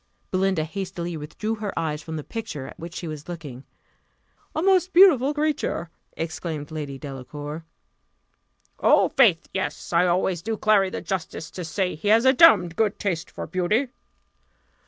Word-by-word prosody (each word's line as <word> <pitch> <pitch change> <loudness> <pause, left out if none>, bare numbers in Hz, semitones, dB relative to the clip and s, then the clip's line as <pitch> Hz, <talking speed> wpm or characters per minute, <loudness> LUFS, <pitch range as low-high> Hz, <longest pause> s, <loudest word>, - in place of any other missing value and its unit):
Belinda 185 -3 +1
hastily 175 0 -5
withdrew 160 +9 -4
her 210 -2 -5
eyes 155 -2 -2
from 160 0 -7
the 155 - -4
picture 160 - -6
at - - -11
which 165 0 -8
she 170 - -5
was 155 0 -7
looking. 145 -7 -8 0.9
"A 315 - 0
most 375 -1 +3
beautiful 315 -8 +6
creature!" 295 - -1 0.3
exclaimed 160 -2 -4
Lady 145 -3 -5
Delacour. 145 +3 -7 1.1
"Oh, - - +4
faith! 230 - +4
yes; 150 - -4
I 175 +2 +4
always 175 0 +1
do 220 +4 -3
Clary 205 -3 +3
the - - -5
justice 170 -4 -4
to 180 - -6
say, 180 +3 -1
he 160 +7 -6
has 225 +4 +5
a 260 - +6
damned 200 - +6
good 215 0 +1
taste 175 -6 -2
for - - -6
beauty." 190 - 0
175 Hz, 155 wpm, -24 LUFS, 155-215 Hz, 1.1 s, beautiful